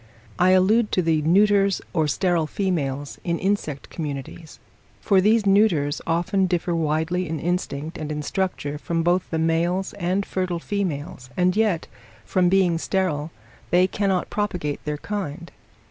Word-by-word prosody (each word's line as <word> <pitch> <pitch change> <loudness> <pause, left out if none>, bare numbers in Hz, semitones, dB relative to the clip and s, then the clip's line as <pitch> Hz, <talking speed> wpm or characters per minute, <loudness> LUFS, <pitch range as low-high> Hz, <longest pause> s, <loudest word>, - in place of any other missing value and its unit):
I 180 - +5
allude 205 +5 +4
to 185 - +2
the 160 -2 +2
neuters 195 +4 +3
or 160 -4 +2
sterile 170 +1 +1
females 145 -8 -2
in 170 -1 -1
insect 185 -8 -2
communities: 150 +1 -6 0.4
for 195 -2 +3
these 215 +2 +3
neuters 195 -8 +3
often 175 +3 +1
differ 175 0 -1
widely 160 +2 0
in 160 -1 -3
instinct 165 -2 -3
and 155 0 -4
in 150 0 -3
structure 150 -5 -2
from 165 +1 -1
both 175 +2 +1
the 165 - -2
males 170 +4 0
and 190 +1 -1
fertile 185 -2 -2
females, 165 -9 -4
and 180 +1 +2
yet, 210 -6 +1 0.4
from 180 -1 +2
being 180 -3 +3
sterile, 165 -6 -1 0.4
they 180 +1 +4
cannot 190 -1 -1
propagate 180 -8 -2
their 150 0 -2
kind. 170 -3 -5
175 Hz, 145 wpm, -23 LUFS, 155-190 Hz, 0.4 s, I